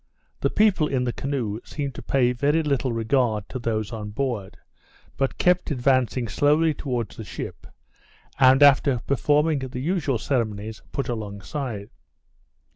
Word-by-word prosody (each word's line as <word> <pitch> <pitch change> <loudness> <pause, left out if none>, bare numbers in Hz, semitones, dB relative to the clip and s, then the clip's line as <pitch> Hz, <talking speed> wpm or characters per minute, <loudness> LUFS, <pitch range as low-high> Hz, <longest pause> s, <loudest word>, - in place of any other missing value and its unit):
The - - +1
people 200 -7 +3
in 130 -3 0
the 120 -1 -1
canoe 125 -7 -3
seemed 140 -3 -4
to - - -8
pay 125 -2 +2
very 145 +6 +1
little 140 -3 0
regard 115 -2 0
to 130 - -5
those 110 -2 -2
on 105 -2 -5
board, 110 -4 -3 0.6
but 135 -1 -1
kept 180 0 +2
advancing 130 -3 +1
slowly 150 +8 +3
towards 125 -8 -4
the - - -6
ship, - - -7 0.7
and 130 +2 +6
after 140 -2 +5
performing 150 +2 +2
the 130 -1 -5
usual 145 -3 0
ceremonies, 110 -3 -2
put 140 - -2
along 105 -4 -5
side. 115 -2 -5
130 Hz, 145 wpm, -24 LUFS, 115-145 Hz, 0.7 s, and